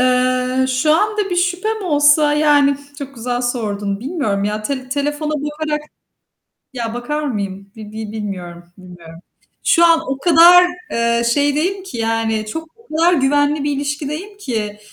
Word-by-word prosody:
Eee, 255 0 +1
şu 265 +4 +2
anda 420 +2 0
bir 355 - -1
şüphem 370 +5 -1
olsa, 295 -1 +4
yani 290 -2 +3 0.2
Çok 275 -1 -8
güzel 245 +1 -3
sordun. 205 -5 -2
Bilmiyorum 250 - -2
ya. 210 +1 -2
Tele 260 +2 -4
telefona 295 +2 -2
bakarak 300 +1 -3 0.9
ya 230 -2 -4
bakar 295 +5 -3
mıyım? 200 -6 -4
Bi 220 -1 -9
bi 220 -1 -6
bilmiyorum. 185 -5 -6
Bilmiyorum. 175 -3 -13 0.5
Şu 340 - +4
an 330 -1 +4
o 270 0 -2
kadar, 345 +2 +7 0.3
eee, 235 0 +1
şeydeyim 305 +7 0
ki, 370 -11 -8
yani, 225 -1 -1
çok 320 +7 -6
o 460 - -25
kadar 340 +2 +4
güvenli 290 0 +2
bir 290 - 0
ilişkideyim 295 +7 -4
ki, 215 - -4
275 Hz, 150 wpm, -18 LUFS, 225-305 Hz, 0.9 s, kadar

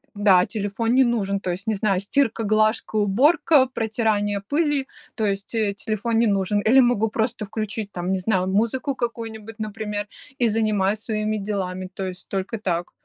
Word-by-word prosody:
да, 195 -3 +5
телефон 220 +2 -2
не 265 - +6
нужен. 200 -5 0
То 185 - -3
есть, 190 +5 -6
не 220 - +1
знаю, 195 -2 +1
стирка, 225 +2 0
глажка, 215 +1 +1
уборка, 260 - +4
протирание 215 -4 -1
пыли, 295 -3 +1 0.3
то 220 - -1
есть, 200 +2 -3
э, 210 -3 +1
телефон 225 +1 -1
не 230 - +4
нужен. 200 0 +1
Или 265 +4 +7
могу 240 -3 +2
просто 220 -1 -2
включить 215 0 -4
там, 180 +1 -3
не 190 - +1
знаю, 185 -1 0
музыку 235 +7 0
какую-нибудь, 225 -2 -5
например, 210 -1 -4 0.3
и 235 - +5
занимаюсь 215 -2 +1
своими 215 -1 -2
делами, 185 -2 -3
то 195 - -4
есть 185 0 -8
только 195 +3 -3
так. 175 -3 -2
215 Hz, 170 wpm, -23 LUFS, 200-225 Hz, 0.3 s, Или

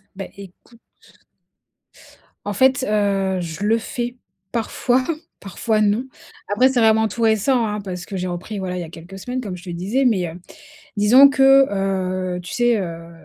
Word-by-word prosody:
Beh, 195 - -7
écoute 200 +4 -15 1.6
en 205 - -2
fait, 260 +4 +3
heu, 195 -3 +1
je 170 +3 -6
le 225 +2 +3
fais 240 +2 -4 0.4
parfois, 245 +2 0 0.4
parfois 215 +2 -1
non. 210 +5 +1 0.5
Après, 250 +6 +4
c'est 260 -2 0
vraiment 220 0 +4
tout 235 - -6
récent, 225 +2 +2
hein, 210 -1 -3
parce 180 -2 -6
que 195 - -6
j'ai 180 0 -3
repris, 185 +4 -5
voilà, 180 -1 -4
il - - -3
y - - -4
a 160 - -9
quelques 175 +4 -11
semaines 250 +5 -4
comme 190 -6 -6
je 175 - -14
te 185 - -9
disais, 195 +10 -1
mais, 190 -8 +2
heu, 170 +3 -10 0.6
disons 250 +7 +7
que 270 0 +5
heu, 185 -2 -2
tu 175 - -8
sais 240 -2 +2
heu, 170 -2 -6
205 Hz, 175 wpm, -21 LUFS, 185-240 Hz, 1.6 s, disons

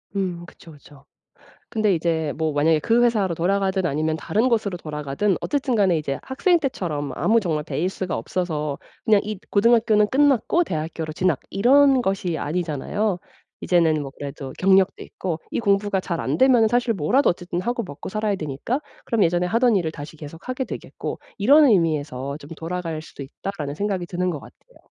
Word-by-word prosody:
음 180 -3 -2
그쵸, 170 -1 -15
그쵸. 145 -1 -17 0.6
근데 215 -3 +1
이제 160 -2 0
뭐 160 -1 0
만약에 155 +2 +3
그 230 +8 +3
회사로 205 -7 +1
돌아가든 190 +2 +1
아니면 155 +1 0
다른 215 +9 0
곳으로 215 -6 0
돌아가든 150 +4 -2
어쨌든 275 -4 -1
간에 190 -5 +3
이제 140 -3 -3
학생 340 +7 +2
때처럼 160 - -3
아무 230 +2 +3
정말 160 -6 -1
베이스가 185 +3 -2
없어서 150 +2 -3 0.3
그냥 215 -2 +5
이 210 -1 -5
고등학교는 215 -1 +4
끝났고 285 +4 +3
대학교로 160 - -4
진학 175 -3 +1
이런 270 +5 +5
것이 190 -5 -1
아니잖아요. 175 +6 -2 0.4
이제는 160 -4 +2
뭐 135 - -6
그래도 140 -2 -6
경력도 190 0 +3
있고 175 -4 -4
이 - - -1
공부가 200 -2 +1
잘 170 -3 -3
안되면은 255 -4 +4
사실 240 0 +1
뭐라도 215 - +2
어쨌든 175 0 -3
하고 240 +5 -2
먹고 145 -4 -8
살아야 215 0 -1
되니까 155 - -3 0.2
그럼 230 -4 +1
예전에 175 +1 +2
하던 230 +3 +3
일을 165 -4 -1
다시 150 +1 -9
계속하게 165 - -6
되겠고 - - -6 0.2
이런 285 +9 +6
의미에서 145 - +1
‘좀 145 - -13
돌아갈 165 -2 -4
수도 145 - -10
있다.‘라는 145 +1 -6
생각이 195 -1 -2
드는 180 +1 -1
것 150 - -5
같아요. - - -18
180 Hz, 395 characters per minute, -23 LUFS, 155-215 Hz, 0.6 s, 이런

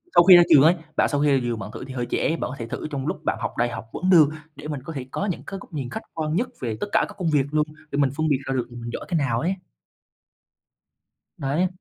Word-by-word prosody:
sau 175 - +8
khi 185 0 +10
ra 175 - +9
trường 140 - +8
ấy, 165 +3 +6 0.2
bạn - - +3
sau 145 -1 0
khi 145 -1 +3
ra 135 - +5
trường 120 -2 -2
bạn 105 +2 -6
thử - - -7
thì 130 - -8
hơi 125 -2 -2
trễ, - - +1
bạn - - -3
có 140 - -6
thể 115 - -5
thử 115 - -5
trong 135 -2 -3
lúc - - -3
bạn - - 0
học - - -2
đại 120 +1 +2
học 120 - -6
vẫn 185 - -1
được, 160 -6 +7 0.3
để - - -8
mình 145 -3 -4
có 165 - -7
thể 130 -4 -5
có 200 - -2
những 185 - -3
cái 195 - -5
góc 190 - -15
nhìn 135 -5 -3
khách - - -5
quan 155 0 -2
nhất 240 +6 +1
về 115 -3 -2
tất - - -2
cả - - +3
các - - -11
công 180 -4 0
việc 145 -3 +3
luôn, 150 0 +1 0.2
để 140 - -2
mình 140 - +4
phân 155 0 +1
biệt 145 - +3
ra 135 - 0
được 125 -2 -1
là 120 - -9
mình 120 - -5
giỏi - - -5
cái 175 - +1
nào 130 -6 +1
ấy. 175 +7 0 1.8
Đấy. 145 +7 +1
145 Hz, 300 wpm, -24 LUFS, 125-165 Hz, 1.8 s, khi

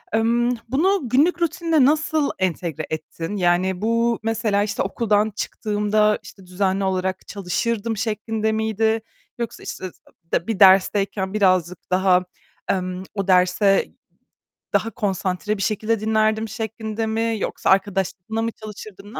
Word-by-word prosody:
Imm, 240 +2 +2
bunu 325 0 +1
günlük 325 +8 +3
rutinine 330 -4 +2
nasıl 310 0 +2
entegre 170 -4 -2
ettin? 165 +4 -5
Yani, 180 +1 +1
bu 230 +1 +1
mesela, 215 -2 +1
işte, 210 0 -2
okuldan 215 -2 +1
çıktığımda, 210 0 0
işte, 190 -2 -13
düzenli 190 +1 0
olarak 190 0 -2
çalışırdım 215 +3 -2
şeklinde 220 0 -1
miydi 220 0 0 0.4
yoksa 235 -2 -5
işte 185 -2 -6 0.6
bir 220 -3 -2
dersteyken 195 0 +4
birazcık 185 -4 +1
daha, 185 -1 +3 0.4
emm, 185 0 -1
o 195 -1 -2
derse 185 +2 +3 0.8
daha 225 - +2
konsantre 195 +1 -2
bir - - -5
şekilde 215 +2 0
dinlerdim 220 0 +1
şeklinde 220 0 -4
mi 225 +1 0
yoksa - - -2
arkadaşlarınla 195 +2 0
mı 230 0 -1
çalışırdın, 210 -1 -11
ne - - -5
210 Hz, 125 wpm, -22 LUFS, 190-225 Hz, 0.8 s, dersteyken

